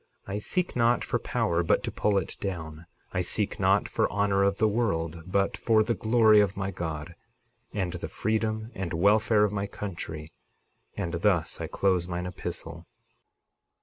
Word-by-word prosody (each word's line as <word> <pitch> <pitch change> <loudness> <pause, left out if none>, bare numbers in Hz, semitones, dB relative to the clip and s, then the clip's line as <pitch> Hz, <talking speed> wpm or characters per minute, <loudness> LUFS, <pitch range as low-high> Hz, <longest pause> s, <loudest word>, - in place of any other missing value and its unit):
I 100 +1 -3
seek 180 - -1
not 120 -1 +3
for - - -1
power, 85 0 0
but 85 - +2
to - - -2
pull 105 -1 +1
it 95 - -2
down. 85 -4 -5 0.3
I - - +1
seek - - 0
not - - +3
for - - 0
honor 100 0 +2
of 100 0 +2
the 110 - +3
world, 85 -8 -1
but 100 +1 +1
for 110 -2 +3
the 115 +2 0
glory 110 0 +5
of 100 -2 +2
my 100 0 -2
God, 80 -2 -5 0.6
and 95 -4 -2
the 85 -2 -5
freedom 110 +3 -1
and 90 -3 -4
welfare 105 +4 +4
of 105 - +2
my 100 0 -2
country. 80 -6 -6 0.6
And 85 - -3
thus 85 -2 +1
I - - -3
close 95 -3 +1
mine 90 0 -3
epistle. 85 -2 -6
100 Hz, 170 wpm, -27 LUFS, 85-105 Hz, 0.6 s, glory